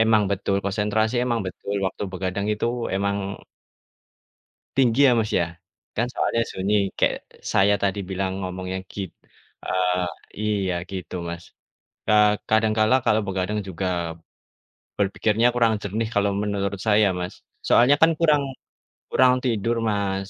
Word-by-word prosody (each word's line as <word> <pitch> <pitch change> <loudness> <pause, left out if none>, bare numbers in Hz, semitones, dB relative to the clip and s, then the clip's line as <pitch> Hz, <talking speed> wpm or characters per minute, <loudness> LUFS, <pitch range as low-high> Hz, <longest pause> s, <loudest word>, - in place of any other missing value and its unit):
Emang 110 -1 +4
betul 100 0 0
konsentrasi, 105 +3 0
emang 120 -2 0
betul 100 +2 -5
waktu 95 - -5
begadang 95 +2 -2
itu 105 +2 -1 0.3
emang 100 +1 0 1.6
tinggi 135 +1 +5
ya - - +5
Mas 110 -1 -1
ya. 85 0 0 0.4
Kan 115 - +2
soalnya 115 -1 +1
sunyi 95 +3 -1 0.2
kayak - - +1 0.3
saya 100 +1 +4
tadi 100 0 +1
bilang 95 0 -2
ngomongnya 95 0 -4
git 100 -2 -4 0.6
eee, 90 -1 +1 0.3
iya 100 -4 0 0.2
gitu 95 -2 -6
Mas. 85 0 -6 0.7
Eee, 105 0 +6 0.2
kadangkala 110 +2 +3
kalau 110 0 +3
begadang 95 +2 -1
juga 95 +1 -4 1.1
berpikirnya 105 +3 +2
kurang 115 -2 +3
jernih 110 +3 -2
kalau 100 0 +2
menurut 100 -1 -2
saya 105 -1 +5
Mas. 90 0 -4 0.3
Soalnya 125 +4 +6
kan 165 +1 +7
kurang, 150 -4 +4 0.7
kurang 130 -1 +5
tidur 115 -2 0
Mas. 100 -2 -1
100 Hz, 130 wpm, -24 LUFS, 95-110 Hz, 1.6 s, kan